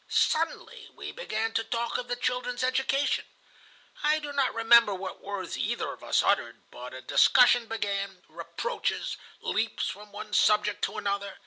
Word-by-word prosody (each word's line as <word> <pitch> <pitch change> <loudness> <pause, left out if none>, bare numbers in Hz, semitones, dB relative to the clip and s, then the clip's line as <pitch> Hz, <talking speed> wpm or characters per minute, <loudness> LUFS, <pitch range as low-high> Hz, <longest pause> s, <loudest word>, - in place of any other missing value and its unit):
Suddenly 325 +1 0
we - - -7
began 225 - -3
to 225 - +1
talk 235 0 -2
of 245 - -6
the 245 - -1
children's 250 0 -2
education. 265 +2 +1 0.8
I 300 +1 +3
do 295 -2 -6
not 275 -2 +2
remember 230 -2 +5
what 190 0 -7
words 200 -1 -5
either - - -2
of - - -15
us - - +2
uttered, - - 0
but 125 +1 -9
a 130 - -8
discussion 245 - +5
began, 200 -4 -3
reproaches, 480 0 -3 0.2
leaps 225 +2 -1
from 210 +1 -9
one 210 +1 -8
subject 210 -1 +3
to - - -6
another. 200 -1 -2
225 Hz, 155 wpm, -28 LUFS, 205-255 Hz, 0.8 s, remember